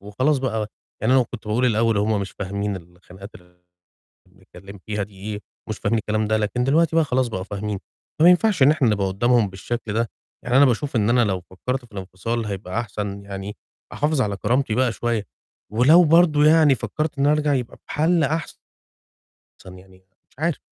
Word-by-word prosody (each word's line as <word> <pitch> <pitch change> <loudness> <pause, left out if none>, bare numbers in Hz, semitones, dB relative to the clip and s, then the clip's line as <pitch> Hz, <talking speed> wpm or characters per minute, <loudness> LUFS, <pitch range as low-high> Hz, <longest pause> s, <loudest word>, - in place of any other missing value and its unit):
وخلاص 130 +9 0
بقى، 110 -5 -2 0.4
يعني 115 - +2
أنا 130 - +5
كنت 115 -3 -8
باقول 115 +4 +1
الأول 115 -1 +2
هُم 105 0 +1
مش 100 - -5
فاهمين 100 0 -3
الخناقات 90 +3 -13
ال - - -12 0.9
اللي - - -26
بنتكلم 100 +2 -13
فيها 105 -1 -2
دي 100 0 -13 0.2
إيه، 105 - -5 0.3
مش 110 - -3
فاهمين 110 +2 0
الكلام 110 +1 -1
ده، 110 0 +2
لكن 110 +3 -1
دلوقتي 160 +5 +2
بقى 165 -1 +4
خلاص 130 -2 0
بقوا 95 -5 -4
فاهمين. 100 0 -4 0.4
فمينفعش 180 +1 +5
إن 140 - +7
إحنا 145 -6 +2
نبقى 100 -2 0
قدّامهم 115 +4 +2
بالشكل 105 +3 -5
ده. 115 +1 0 0.3
يعني 125 +1 +1
أنا 145 - +7
باشوف 135 +2 -1
إن 110 -1 +2
أنا 120 0 +4
لو 95 -3 -1
فكرت 125 +9 -5
في 115 - -24
الانفصال 100 +4 -4
هيبقى 100 0 -4
أحسن، 100 -3 -5
يعني، 100 +1 -7 0.4
أحافظ 150 -1 0
على 100 -4 -1
كرامتي 125 0 0
بقى 125 0 +2
شوية، 115 -2 -2 0.5
ولو 145 +10 +6
برضو 160 -2 +4
يعني 155 -2 +5
فكرت 155 +4 -4
إني 140 - +3
أرجع 150 -1 +1
يبقى 125 -3 -3
بحل 165 +2 +1
أحسن 155 +3 -2 1.2
يعني 95 0 -18 0.3
مش - - -31
عارف. 160 0 0
115 Hz, 185 wpm, -22 LUFS, 100-140 Hz, 1.2 s, إن